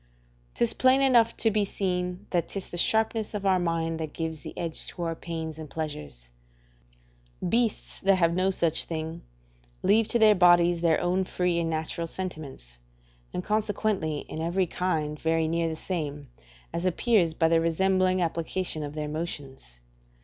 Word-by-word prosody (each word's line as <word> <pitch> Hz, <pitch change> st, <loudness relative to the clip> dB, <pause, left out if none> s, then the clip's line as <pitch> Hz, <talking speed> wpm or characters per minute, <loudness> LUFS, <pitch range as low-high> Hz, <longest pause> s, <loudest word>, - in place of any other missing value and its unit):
'Tis 235 Hz, -1 st, +2 dB
plain 260 Hz, +1 st, +4 dB
enough 245 Hz, -4 st, +4 dB
to 225 Hz, -, +2 dB
be 210 Hz, 0 st, +2 dB
seen 180 Hz, -1 st, -2 dB
that 175 Hz, -2 st, +1 dB
'tis 195 Hz, -2 st, -6 dB
the -, -, -7 dB
sharpness 220 Hz, +3 st, +2 dB
of 200 Hz, -1 st, -4 dB
our 190 Hz, -1 st, +4 dB
mind 165 Hz, -1 st, -1 dB
that 155 Hz, -2 st, -5 dB
gives 160 Hz, -2 st, -4 dB
the -, -, -9 dB
edge 165 Hz, -2 st, -2 dB
to 175 Hz, -, -5 dB
our 165 Hz, -1 st, -1 dB
pains 160 Hz, -1 st, -6 dB
and 155 Hz, -2 st, -8 dB
pleasures: 75 Hz, -, -6 dB, 1.2 s
beasts 230 Hz, +2 st, 0 dB
that 195 Hz, 0 st, +4 dB
have 170 Hz, -2 st, +2 dB
no 185 Hz, +2 st, +2 dB
such 170 Hz, -4 st, +1 dB
thing, 160 Hz, 0 st, -5 dB, 0.6 s
leave 210 Hz, +3 st, +4 dB
to 240 Hz, -, +1 dB
their 220 Hz, -2 st, +6 dB
bodies 175 Hz, -2 st, +5 dB
their 165 Hz, -2 st, +3 dB
own 180 Hz, +2 st, +1 dB
free 180 Hz, -2 st, 0 dB
and 165 Hz, -1 st, -1 dB
natural 160 Hz, +1 st, -3 dB
sentiments, 150 Hz, -, -7 dB, 0.5 s
and 180 Hz, -, -4 dB
consequently 205 Hz, -7 st, -1 dB
in 160 Hz, -, -7 dB
every 175 Hz, +3 st, +1 dB
kind 155 Hz, -4 st, -2 dB
very 160 Hz, 0 st, +1 dB
near 165 Hz, +1 st, 0 dB
the 160 Hz, -, -4 dB
same, 150 Hz, -5 st, -4 dB, 0.4 s
as 170 Hz, +1 st, -2 dB
appears 185 Hz, -2 st, +2 dB
by 165 Hz, -, +3 dB
the 165 Hz, 0 st, +3 dB
resembling 185 Hz, +2 st, +2 dB
application 165 Hz, 0 st, -2 dB
of 145 Hz, 0 st, -6 dB
their 150 Hz, -1 st, -3 dB
motions. 140 Hz, -, -6 dB
170 Hz, 165 wpm, -27 LUFS, 160-190 Hz, 1.2 s, their